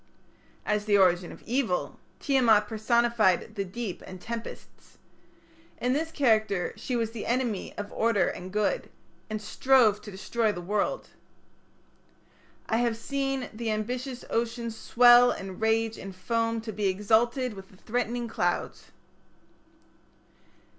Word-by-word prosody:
As 210 0 0
the 205 -1 +4
origin 180 -2 +3
of - - -13
evil 240 -7 -1 0.2
Tiamat 230 -7 +3
personified 220 -3 +2
the 200 -2 -2
deep 195 +1 -6
and 185 - -9
tempests. 230 +3 -8 0.8
In 250 +1 0
this 320 +3 -1
character 220 - +1
she 255 - -4
was 225 -2 -1
the 230 -2 -6
enemy 240 -5 -2
of 205 0 -6
order 225 -3 +2
and 185 +1 -6
good, 210 - 0 0.4
and 215 0 -3
strove 220 -1 +3
to - - -10
destroy 215 +3 -1
the 175 - -6
world. 205 - -2 1.6
I 225 - +1
have 235 -1 +1
seen 270 +1 -2
The 225 +1 -4
ambitious 245 +4 -3
ocean 235 0 -1
swell 240 +2 +6
and 195 -3 -5
rage 225 0 +1
and 195 -1 -8
foam 230 +4 -1
To 220 0 -6
be 205 -1 -1
exalted 225 +6 +1
with 195 -1 -11
the 190 - -19
threatening 240 +2 -2
clouds. - - -2
225 Hz, 135 wpm, -27 LUFS, 205-240 Hz, 1.6 s, swell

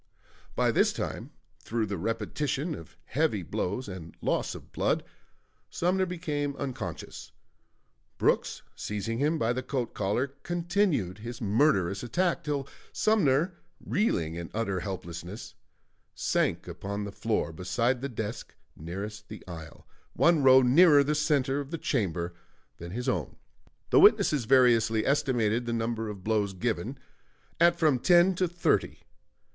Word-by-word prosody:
By - - +2
this - - +3
time, - - -4 0.3
through 115 -1 -2
the 100 -4 -4
repetition 130 - -2
of 80 - -9
the - - -26
heavy - - 0
blows 105 +7 -3
and 90 -4 -9
loss - - -1
of - - -12
blood, - - 0 0.7
Sumner 185 +2 +1
became 150 -5 -3
unconscious. 135 -3 -6 0.9
Brooks, - - +1
seizing 105 +3 -3
him 150 +3 +2
by 115 -3 +1
the 130 - -2
coat 125 -2 -3
collar, 105 +7 0
continued 175 - 0
his 115 +2 -7
murderous 100 - +2
attack 170 +9 0
till 145 -3 -2 0.2
Sumner, 175 -5 +2 0.3
reeling 85 - 0
in 85 0 -6
utter 100 -4 -1
helplessness, 90 0 -7 0.6
sank - - 0
upon 100 +1 -5
the 100 - -5
floor 105 -5 -1
beside 105 +9 0
the 140 - -3
desk 110 -1 -6 0.2
nearest 105 +6 -7
the 110 - -9
aisle, 80 -2 -10 0.3
one 170 -3 +4
row 130 -1 +7
nearer 145 +3 +6
the 150 +2 0
center 145 -3 +1
of 140 -1 -5
the 165 - -3
chamber 90 - -1 0.4
than 85 - -8
his 125 +8 -4
own. 85 - -1 0.6
The - - +6
witnesses 140 -6 +5
variously 115 -3 +4
estimated 120 -5 +1
the 120 - -1
number 115 -1 -2
of 100 -3 -8
blows 105 -2 0
given 90 - -2 0.6
at 170 0 +5
from 155 -6 +3
ten 175 +5 +5
to 185 - +2
thirty. 175 +1 0
120 Hz, 140 wpm, -28 LUFS, 100-150 Hz, 0.9 s, row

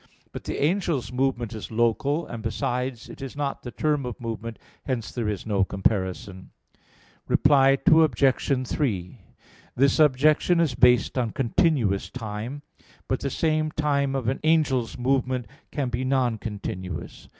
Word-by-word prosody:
But - - -8
the - - -3
angel's 150 - 0
movement 125 -3 -1
is 110 - -7
local, 135 +8 +1
and, 115 - -7
besides, 125 +1 -3
it - - -11
is 135 0 -6
not 140 -1 -3
the 125 - -7
term 150 +2 0
of 125 -3 -6
movement; 115 -1 -5 0.3
hence 125 -5 -3
there 115 -4 -2
is 105 -3 -4
no 100 -3 +1
comparison. 95 0 -2 0.8
Reply 135 -1 +4
Obj. 135 -3 +3
3: 105 - -2 0.6
This 135 +3 +3
objection 155 +4 +4
is 160 -6 +2
based 125 +1 +4
on 120 -2 0
continuous 115 - +1
time. 115 +4 -6 0.4
But 130 - 0
the 140 - -2
same 155 +2 0
time 140 -3 0
of 130 -4 -2
an 130 - 0
angel's 150 -7 +2
movement 130 -1 0 0.2
can 140 -4 -2
be 120 +1 -2
non 130 -4 +1
continuous. 95 -5 -6
130 Hz, 145 wpm, -25 LUFS, 115-140 Hz, 0.8 s, Reply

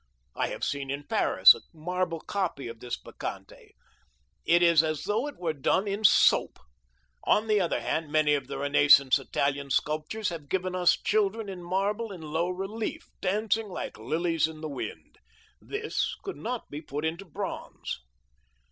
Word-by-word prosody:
I - - 0
have - - -6
seen 140 -1 -2
in 140 +1 -3
Paris - - +6
a - - -11
marble 170 +1 -2
copy 180 -10 -3
of 115 -1 -8
this 120 0 -4
Bacchante. - - -8 0.7
It 175 +1 +4
is 170 -2 +6
as 155 -2 -2
though 220 +7 0
it 290 - -8
were 170 -3 -1
done 170 +8 +1
in 200 +2 -2
soap. 205 - +5 0.7
On 210 - +3
the 215 -2 +3
other 175 - 0
hand, 160 -2 -2
many 155 -1 +3
of 140 -3 -1
the - - -5
renaissance 145 -1 +5
Italian 140 +1 -1
sculptors 155 +10 -1
have 160 -5 -8
given 185 -1 -1
us 180 -1 +4
children 210 0 0
in 185 -2 -7
marble 200 +5 -1
in 180 -4 -8
low 160 +3 -1
relief, 215 - -4
dancing 215 +3 0
like 185 - -6
lilies 160 +7 0
in 155 -1 -10
the 155 - -4
wind. 140 -3 -7 0.4
They 435 +1 -5 0.4
could 390 - -5
not 240 +1 -5
be 145 +1 -5
put 150 0 -4
into 170 +5 -3
bronze. 165 - -5
170 Hz, 165 wpm, -28 LUFS, 150-200 Hz, 0.7 s, Paris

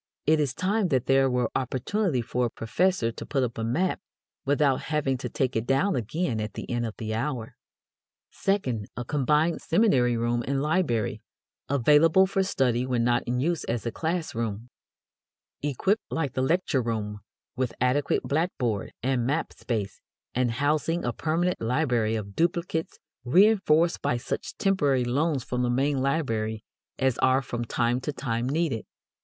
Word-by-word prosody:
It 155 +1 +4
is 140 -3 0
time 200 +2 +1
that 130 -7 +1
there 135 0 +4
were 125 -2 0
opportunity 130 - 0
for 125 +1 0
a - - -6
professor 120 +3 0
to - - -8
put 135 -3 0
up 120 -2 -3
a - - -1
map 150 +12 0 0.5
without 140 -1 +2
having 150 -4 +1
to - - -4
take 130 -1 -1
it 115 +2 -1
down 145 +9 +2
again 120 - -1
at 105 0 -5
the - - -6
end 120 -1 0
of 110 - -7
the 110 -1 -4
hour. 120 -1 -3 0.8
Second, 130 - -1
a 120 - -3
combined 150 +5 +1
seminary 130 - +3
room 120 +1 0
and 140 0 0
library, 150 - 0 0.5
available 150 +7 +5
for 195 0 0
study 125 -10 +1
when 125 -2 0
not 120 0 +2
in 125 +1 0
use 165 +4 0
as 120 0 -2
a 115 - -1
class 165 +5 -2
room; 115 0 -3 0.9
equipped, 145 - 0
like 145 -6 -2
the 130 - -1
lecture 160 -1 +1
room, 105 -3 -3 0.4
with 125 -1 -1
adequate 130 +3 +1
blackboard 140 - -1
and 125 -2 +1
map 155 +4 -1
space, 105 -5 -4 0.3
and 120 -2 +1
housing 155 +5 0
a 120 - -1
permanent 170 +5 0
library 120 -3 +1
of 100 -2 -5
duplicates 170 -1 -1 0.3
reënforced 175 - +4
by 120 - 0
such 120 - -5
temporary 145 -10 +2
loans 140 +2 0
from 125 0 -2
the 125 - +1
main 135 +3 +1
library 115 -7 -1 0.3
as 130 -2 +1
are 130 +1 +3
from 120 -1 -4
time 120 +1 0
to 150 - -2
time 120 -3 -2
needed. 145 -6 0
130 Hz, 165 wpm, -26 LUFS, 120-160 Hz, 0.9 s, available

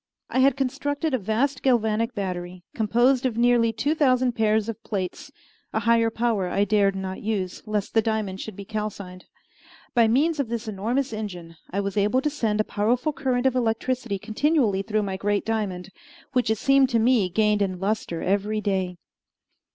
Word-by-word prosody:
I 260 - +1
had 270 0 +4
constructed 285 +3 -1
a 260 - +2
vast 240 +7 0
galvanic 230 -2 +1
battery, 180 -2 -4
composed 240 +4 +2
of 250 -4 -1
nearly 235 -1 +4
two 225 +7 0
thousand 255 -5 +3
pairs 220 -1 +1
of 230 0 -6
plates: 205 - -4 0.4
a 220 - 0
higher 230 +1 +3
power 225 -4 0
I 195 +3 +1
dared 205 -2 +2
not 190 0 -5
use, 200 -4 -3
lest 210 -2 -2
the 225 - +4
diamond 215 -3 -2
should 220 - -7
be 200 - -8
calcined. 200 -4 -5 0.7
By 235 -2 +5
means 295 +7 +2
of 270 -5 -1
this 235 -1 -4
enormous 225 +6 -1
engine 180 -6 -6
I 200 +3 -1
was 200 0 -3
enabled 210 +6 +2
to 300 - 0
send 220 -7 -1
a - - +4
powerful 240 +9 0
current 255 -3 -1
of 260 -1 +3
electricity 240 -2 -1
continually 225 -1 +1
through 215 +1 -1
my 190 -1 -3
great 205 +1 0
diamond, 205 -5 -3 0.4
which 250 -3 +1
it 220 - +2
seemed 275 +2 +4
to 235 - +2
me 225 -5 +3
gained 210 +2 +2
in 185 -2 -1
lustre 195 -4 -2
every 205 +3 0
day. 190 -4 -1
220 Hz, 180 wpm, -24 LUFS, 200-245 Hz, 0.7 s, By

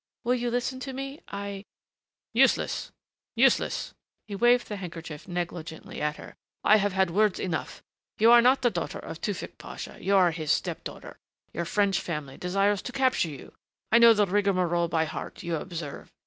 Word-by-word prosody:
Will 245 - +2
you 245 -1 -1
listen 245 +2 -2
to 265 +1 -6
me? 275 +3 -6
I 200 0 -6 0.4
" - - -67 0.3
"Useless, - - +2 0.4
useless." - - +2 0.3
He 205 - -7
waved 240 +3 +4
the 210 - -5
handkerchief 165 -4 -8
negligently 170 -3 -5
at 150 0 0
her. - - -11 0.3
"I 215 - +6
have 205 -1 0
had 190 -2 +2
words 210 +1 +2
enough. 175 -4 -4 0.3
You 225 +2 +6
are 240 0 +9
not 260 +2 +4
the 240 - +4
daughter - - -3
of - - -8
Tewfick - - -4
Pasha - - -8
you 200 +1 +2
are 180 -3 +5
his 155 -2 -2
step - - -1
daughter - - -9 0.3
your 170 - -2
French 195 +1 +1
family 150 -7 -5
desires 195 +2 +1
to - - -6
capture 260 -9 +1
you 140 -3 -10 0.4
I 230 - +7
know 230 -1 +8
the 210 -1 +4
rigmarole 185 -3 +1
by 160 -1 +1
heart, 155 - -7
you 170 -1 -1
observe. 160 -3 -7
195 Hz, 180 wpm, -27 LUFS, 170-235 Hz, 0.4 s, are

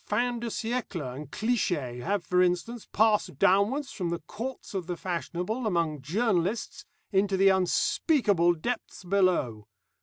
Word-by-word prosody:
Fin 245 0 0
de 235 - -4
siècle 220 - -3
and 145 0 -8
cliché 150 - -1
have, 195 +5 -1
for 180 +3 +3
instance, 180 +6 0
passed 210 -9 +2
downward 205 - +3
from 185 -9 -4
the 170 - -1
courts 225 - -7
of 185 -4 -3
the 175 -1 -3
fashionable 180 +6 -3
among 165 -6 0
journalists 195 - -1 0.3
into 195 -1 +2
the 195 +1 +6
unspeakable 190 - +2
depths 230 +5 -4
below. 175 - +1
190 Hz, 140 wpm, -28 LUFS, 170-225 Hz, 0.3 s, the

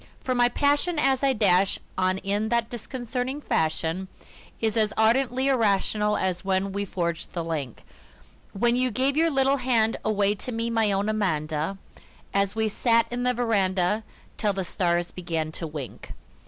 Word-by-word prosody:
For 255 - -2
my 245 -1 +4
passion 290 +6 +2
as 270 -3 +2
I 275 -1 +3
dash 195 -4 +3 0.2
on 185 0 +1
in 205 +3 -1
that 235 -1 0
disconcerting 250 +3 -4
fashion 160 - -1 0.5
Is 220 -2 0
as 215 -2 +2
ardently 250 +4 +2
irrational 210 -4 +2
as 185 -1 -1
when 195 0 0
we 200 +1 -2
forged 170 -3 -3
the 170 - -2
link 150 -7 -4 0.7
When 235 +4 +1
you 255 0 +2
gave 260 +5 0
your 330 +2 +3
little 270 -1 +2
hand 235 -4 +1
away 205 -1 +2
to 210 +4 -6
me, 230 0 -2
my 225 -2 +2
own 200 +1 0
Amanda 160 -4 -1 0.6
An 200 0 +3
we 220 0 +1
sat 230 +1 +2
'n 245 - -2
the 250 0 +1
veranda 205 -3 +1 0.3
till 210 -2 +1
the 190 -1 -3
stars 175 -1 0
began 165 -3 -3
to 165 +1 -4
wink. 150 -5 -8
210 Hz, 165 wpm, -25 LUFS, 185-245 Hz, 0.7 s, my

